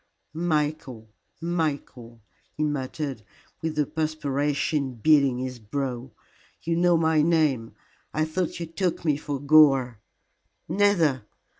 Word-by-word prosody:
"Michael 150 -9 -2 0.3
Michael," 140 -9 -3 0.3
he 155 - 0
muttered, 140 -3 -3 0.4
with 160 -1 -3
the 150 -1 +1
perspiration 145 -2 -1
beading 140 +1 +3
his 130 -1 -5
brow. 125 +2 -4 0.5
"You 165 0 0
know 175 0 +3
my 160 -1 +3
name. 150 -8 +1 0.4
I 155 +1 0
thought 165 +2 -3
you 170 - -3
took 170 +1 -2
me 150 -3 +3
for 145 -2 -4
Gore." 135 -5 +4 0.7
"Never. 170 - +2
150 Hz, 115 wpm, -25 LUFS, 130-160 Hz, 0.7 s, Gore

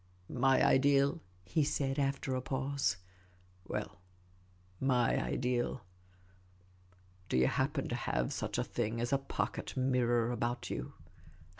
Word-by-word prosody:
" 90 0 -31
My 135 +1 +3
ideal? 140 +1 +4
" 90 0 -30
he 155 - +5
said, 140 -1 0
after 135 -1 0
a 130 - -1
pause. 135 -5 -1 0.3
" 90 0 -28
Well, 90 - -4 0.8
my 125 -3 +2
ideal 125 -2 -1 0.8
— 90 0 -30
do - - +1
you 65 - +5
happen 135 - 0
to 120 - -1
have 60 - -1
such - - -3
a - - +1
thing 115 -1 -2
as 120 +3 -1
a 135 - +4
pocket 135 - -3
mirror 120 -2 +2
about 120 +1 -2
you - - -4
120 Hz, 145 wpm, -33 LUFS, 95-135 Hz, 0.8 s, he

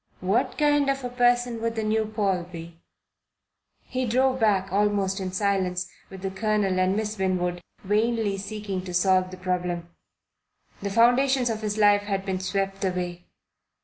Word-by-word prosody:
What 195 +7 0
kind 290 -2 +3
of 275 -1 -1
a 250 - -3
person 245 -1 +2
would 230 0 -1
the 220 - -1
new 215 0 +1
Paul 200 -4 0
be? 165 -1 -10 1.0
He 255 -1 -3
drove 260 +3 +2
back 195 -4 +2
almost 200 -1 +1
in 185 -1 -3
silence 185 -2 0 0.2
with 190 0 -10
the 195 - -2
Colonel 200 -2 0
and 185 +1 +2
Miss 215 -1 -3
Winwood, 180 -2 0 0.2
vainly 215 +1 +1
seeking 200 -2 -4
to 180 -1 -5
solve 185 0 +3
the 185 - -9
problem. 180 -2 -2 0.9
The 200 - -2
foundations 245 +3 +3
of 220 -1 -4
his 210 -1 -2
life 205 -1 +5
had 195 -1 -3
been 190 -1 -2
swept 195 +1 -2
away. 180 -2 -3
200 Hz, 160 wpm, -25 LUFS, 185-225 Hz, 1.0 s, life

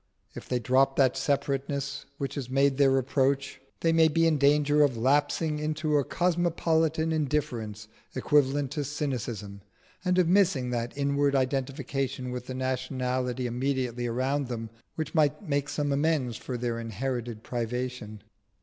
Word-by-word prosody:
If - - -10
they 125 - +1
drop 130 +3 +2
that 130 -3 +3
separateness 140 0 -1
which 140 -1 -4
is 135 -4 -4
made 135 0 +2
their 140 -1 +5
reproach, 135 +1 +1 0.2
they 165 -1 +3
may 165 -1 +6
be 165 +2 +2
in 155 -3 +3
danger 145 +1 +4
of 140 -5 +3
lapsing 145 +5 +1
into 155 0 -1
a 140 - +2
cosmopolitan 165 -2 +1
indifference 125 -9 -2 0.3
equivalent 140 0 +2
to 145 0 -2
cynicism, 120 -8 -4 0.4
and 180 -1 +1
of 180 -2 +4
missing 170 -9 +3
that 120 +2 -3
inward 140 0 +1
identification 135 -1 -1
with 125 0 -6
the 130 - -5
nationality 130 -1 -2
immediately 125 -1 -1
around 130 +4 -1
them 115 -2 -5 0.2
which 155 -2 -4
might 150 +3 +1
make 145 -1 0
some 145 -1 -1
amends 140 -4 +1
for 125 +2 -5
their 120 -1 -2
inherited 115 0 -4
privation. 120 -3 -4
135 Hz, 145 wpm, -28 LUFS, 125-150 Hz, 0.4 s, may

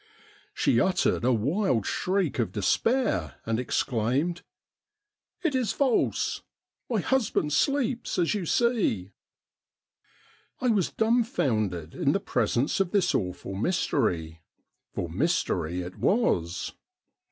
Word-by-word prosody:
She - - +3
uttered 185 -8 +1
a 125 - +3
wild 130 - +1
shriek 185 -7 0
of 120 - 0
despair 235 - +1
and 115 0 0
exclaimed: 130 +7 0 0.5
' 420 -2 -44
It 330 -4 +1
is 255 -6 0
false! 265 -4 +1 0.5
my 225 -5 +1
husband 220 - 0
sleeps, 260 - 0
as 175 +1 +2
you 195 -5 -3
see.' 200 - +1 1.5
I 250 - +1
was 205 -6 +2
dumfoundered 120 - 0
in - - +1
the - - +1
presence 140 - 0
of 195 -2 +1
this 185 -1 +2
awful 90 0 -3
mystery, 85 - -1 0.5
for - - -3
mystery 85 +1 0
it 90 +1 -9
was. 90 - +1
175 Hz, 115 wpm, -27 LUFS, -, 1.5 s, She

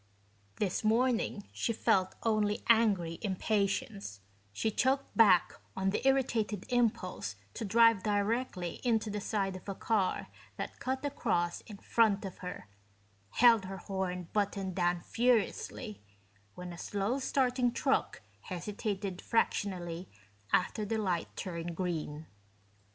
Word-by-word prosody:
This 195 0 -1
morning 225 -2 +1
she 230 - -1
felt 185 -3 +2
only 215 -2 +1
angry 200 -8 +3
impatience; 200 - -1 0.3
she 220 - -1
choked 265 +5 +1
back 195 -6 +6 0.2
on 190 0 +1
the - - -1
irritated 235 -7 +1
impulse 215 - 0 0.2
to - - -5
drive 230 0 +5
directly 205 -3 -1
into 225 -3 +1
the 210 0 -3
side 195 -2 -1
of 185 +2 -9
a 195 - -3
car 200 -2 0 0.3
that - - -5
cut 265 +2 -2
across 175 -11 0
in 210 -3 -9
front 215 -1 +2
of 190 - -7
her, 180 - -7 0.6
held 230 - +5
her 190 +1 -6
horn 185 -3 -3
button 200 -2 0
down 175 -1 +1
furiously 230 0 0 0.5
when 180 -1 -7
a 170 - -10
slow 205 +6 -1
starting 255 -2 +1
truck - - 0 0.2
hesitated 195 0 -4
fractionally 180 -6 -1 0.4
after 210 +4 +2
the 220 +2 -1
light 185 -6 0
turned 170 -2 -4
green. 160 -4 -3
205 Hz, 125 wpm, -32 LUFS, 185-230 Hz, 0.6 s, back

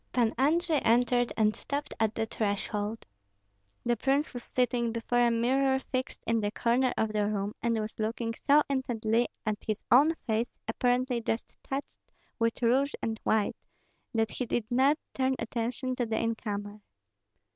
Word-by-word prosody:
Pan 235 -3 +2
Andrei 315 +4 +2
entered 245 +1 +3
and 215 -1 +3
stopped 285 +1 -4
at 220 -1 +1
the 225 - 0
threshold. 210 0 -2 0.8
The 240 0 +2
prince 275 +6 +1
was 245 - -4
sitting 245 -1 0
before 235 +1 0
a 240 -1 +5
mirror 265 +3 +2
fixed 260 -1 -3
in 230 0 +2
the 205 - 0
corner 245 +4 +2
of 220 -1 0
the 210 -1 +1
room, 205 0 -2
and 230 -1 +1
was 215 +1 -5
looking 230 +1 -1
so 290 +5 +4
intently 240 -4 +1 0.2
at 215 -2 -2
his 215 -2 -1
own 295 +6 +6
face, 230 +1 0 0.2
apparently 245 0 +1
just 225 0 -3
touched 275 +1 -3 0.5
with 230 +1 0
rouge 265 +4 +3
and 220 -1 -2
white, 220 -2 +1 0.6
that 225 -2 0
he 250 - -3
did 235 -1 0
not 270 +5 +4 0.2
turn 265 0 +1
attention 240 +2 -2
to 245 - 0
the 220 0 -1
incomer. 210 -2 -3
235 Hz, 160 wpm, -29 LUFS, 220-255 Hz, 0.8 s, own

